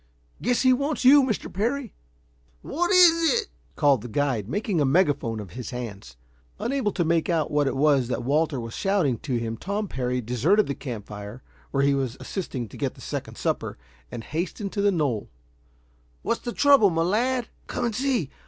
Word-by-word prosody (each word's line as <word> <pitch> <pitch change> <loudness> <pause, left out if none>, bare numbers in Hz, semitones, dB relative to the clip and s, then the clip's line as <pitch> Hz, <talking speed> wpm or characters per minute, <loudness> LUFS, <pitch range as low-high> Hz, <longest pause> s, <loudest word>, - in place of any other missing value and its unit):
Guess 245 +1 +1
he 255 0 +6
wants 280 +1 -1
you, 285 +3 +8
Mr. 230 -6 -2
Parry." 240 +6 -2 0.7
"What 345 +3 -1
is 345 +2 +5
it!" 455 - -5 0.3
called 140 -6 +3
the 120 - -7
guide, 120 -4 -1
making 195 - -1
a - - +4
megaphone 140 -6 +1
of 100 -5 -8
his 125 +5 -7
hands. 105 - -7 0.4
Unable 250 -4 -1
to 175 - 0
make 165 0 +1
out 160 -4 0
what 145 -1 +2
it - - -1
was 140 -3 +3
that 125 - -3
Walter 145 +1 +1
was 115 -1 -6
shouting 180 - +1
to 130 -4 -3
him, 115 -1 -3
Tom 200 - -3
Parry 125 -4 -2
deserted 125 - +2
the 140 - -2
camp 120 -8 -6
fire, 105 +4 -9 0.3
where 140 0 +1
he 140 0 +3
was 135 -3 -2
assisting 135 - -4
to - - -11
get - - -2
the - - -17
second - - -6
supper, - - -2 0.3
and 115 - -6
hastened 180 - -4
to 200 - -2
the 205 0 +4
knoll. 145 - -1 0.9
"What's - - -1
the 240 - -4
trouble, 280 -6 +5
my 165 -1 0
lad?" 240 +6 0 0.2
"Come 245 - -2
and 230 -3 -2
see. 250 - 0
155 Hz, 190 wpm, -25 LUFS, -, 0.9 s, you